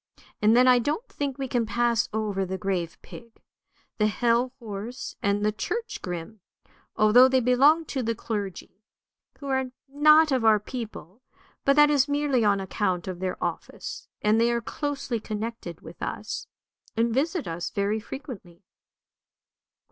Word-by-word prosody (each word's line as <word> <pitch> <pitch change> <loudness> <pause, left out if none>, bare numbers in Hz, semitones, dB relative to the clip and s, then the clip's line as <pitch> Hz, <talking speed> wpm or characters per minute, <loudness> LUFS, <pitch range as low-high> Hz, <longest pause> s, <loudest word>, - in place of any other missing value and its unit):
And 215 +2 +5
then 250 +1 +6
I 250 -1 +6
don't 300 - -2
think 280 -3 -3
we 270 -1 -3
can 240 -3 0
pass 235 0 +1
over 210 -3 -1
the 190 0 -3
grave 180 -3 -2
pig, 230 -1 -12
2 - - -30 0.6
the 210 - +4
hell 235 +3 +1
horse, 225 +1 -7
and 200 +1 +1
the 210 - +3
church 430 - -4
grim, 180 +4 -6 0.6
although 220 +5 +7
they 260 0 +3
belong 275 +7 +4
to 270 -3 -3
the 230 -1 -1
clergy, 200 -3 -5 0.6
who 280 - -11
are 265 -1 0 0.2
not 305 +2 +5
of 260 -3 +1
our 220 -1 +5
people; 220 - -8 0.4
but 275 - +5
that 295 0 +6
is 285 -1 +3
merely 285 -4 +1
on 200 -2 +3
account 185 -2 -2
of 185 -2 -5
their 185 0 -2
office, - - -5 0.2
and 215 +2 +4
they 235 +1 +3
are 235 - +1
closely 275 -2 -3
connected 215 -5 -5
with - - -12
us, - - -4 0.5
and 230 0 +2
visit 315 +6 0
us 170 +1 -3
very 205 +2 -1
frequently." 220 - -9
230 Hz, 160 wpm, -26 LUFS, 205-265 Hz, 0.6 s, although